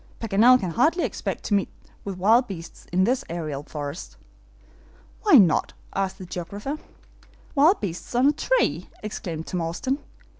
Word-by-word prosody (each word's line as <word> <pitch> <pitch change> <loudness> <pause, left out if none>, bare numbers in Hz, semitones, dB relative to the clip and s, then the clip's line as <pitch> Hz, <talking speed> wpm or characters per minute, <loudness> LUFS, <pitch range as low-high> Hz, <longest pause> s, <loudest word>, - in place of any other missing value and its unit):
Paganel 230 +4 +5
can 180 -6 -3
hardly 315 - +2
expect - - -3
to - - -2
meet 200 -1 +2 0.3
with 195 -2 -5
wild 225 +7 +4
beasts 170 -4 -9
in 185 +2 +3
this 250 +6 +1
aerial 155 -4 -4
forest." 145 +1 -7 1.0
"Why 420 - +2
not?" 185 -8 +4 0.2
asked 190 -1 -1
the 185 - -8
geographer. 200 - -5 0.7
"Wild 315 +7 +5
beasts 180 +4 -5
on 250 +2 +4
a 285 - +6
tree!" - - 0
exclaimed 170 -6 -5
Tom 180 - -3
Austin. 215 - -2
195 Hz, 150 wpm, -25 LUFS, 170-255 Hz, 1.0 s, a